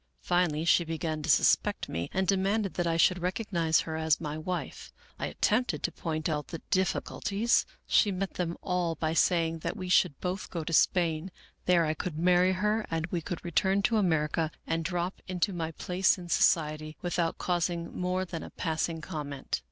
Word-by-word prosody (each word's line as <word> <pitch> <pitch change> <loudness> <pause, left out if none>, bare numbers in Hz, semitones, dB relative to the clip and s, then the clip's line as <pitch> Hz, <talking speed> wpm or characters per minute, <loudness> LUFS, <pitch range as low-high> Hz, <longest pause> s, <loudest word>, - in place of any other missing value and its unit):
Finally 170 -3 +1
she 170 - +5
began 160 -1 -3
to - - -4
suspect - - +3
me 85 +1 -3
and 190 0 0
de 195 - +4
manded 195 +1 0
that 175 -1 -1
I 165 0 +1
should 180 +2 +4
recognize 180 -4 +1
her 160 - -5
as 160 -2 +2
my 150 -2 -4
wife. 175 +3 -5 0.3
I - - -1
at - - -10
tempted 215 - +2
to 175 - 0
point 155 -2 -3
out 150 -2 -2
the 165 - -7
difficulties. 200 +3 +1 0.2
She 205 - +4
met 190 0 -3
them 170 -1 -3
all 180 -3 0
by 160 0 -1
saying 165 -1 +2
that - - -4
we 185 -1 -5
should 180 -5 +3
both 185 +1 -3
go 165 -2 -4
to 165 - -4
Spain, 165 0 +2 0.4
there 175 -2 +4
I 155 - 0
could 155 0 -5
marry 180 +2 +4
her 210 +4 0
and 160 -1 -1
we 175 - -1
could 175 +2 -6
return 190 +3 +2
to 225 +3 +2
America 160 -4 +1 0.2
and 165 0 -1
drop 175 +2 -2
into 185 +2 0
my 165 -2 -2
place 180 +4 +1
in 175 -1 -9
society 155 -2 +2
without 175 -2 0
causing 175 -1 -1
more 185 +1 -1
than 170 -3 -6
a - - -8
passing 160 0 -2
comment. 145 - -4
170 Hz, 190 wpm, -29 LUFS, 160-185 Hz, 0.4 s, she